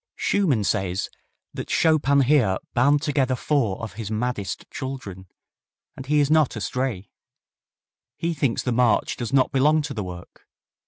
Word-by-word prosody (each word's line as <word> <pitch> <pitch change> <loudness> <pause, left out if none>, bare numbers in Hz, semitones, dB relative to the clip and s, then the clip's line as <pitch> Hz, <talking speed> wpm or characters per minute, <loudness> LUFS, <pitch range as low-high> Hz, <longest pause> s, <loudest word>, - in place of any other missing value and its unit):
Schumann 150 - +1
says 95 0 -1 0.4
that - - -6
Chopin 145 -3 +3
here 125 -9 +3 0.2
"bound 145 +4 +3
together 135 -4 +1
four 125 -7 0
of 110 -4 -6
his 105 - -5
maddest 110 -3 -3
children," 130 -9 -7 0.7
and 135 - -9
he 150 +1 +3
is 145 0 +2
not 155 -5 +3
astray. 110 -1 -3 1.1
He 170 0 -1
thinks 140 -6 -1
the 125 - -1
march 120 -1 +2
does 120 -3 -5
not 135 -2 +3
belong 150 +3 +3
to 150 - -5
the 105 - -4
work. 90 -1 -10
130 Hz, 150 wpm, -24 LUFS, 105-145 Hz, 1.1 s, Chopin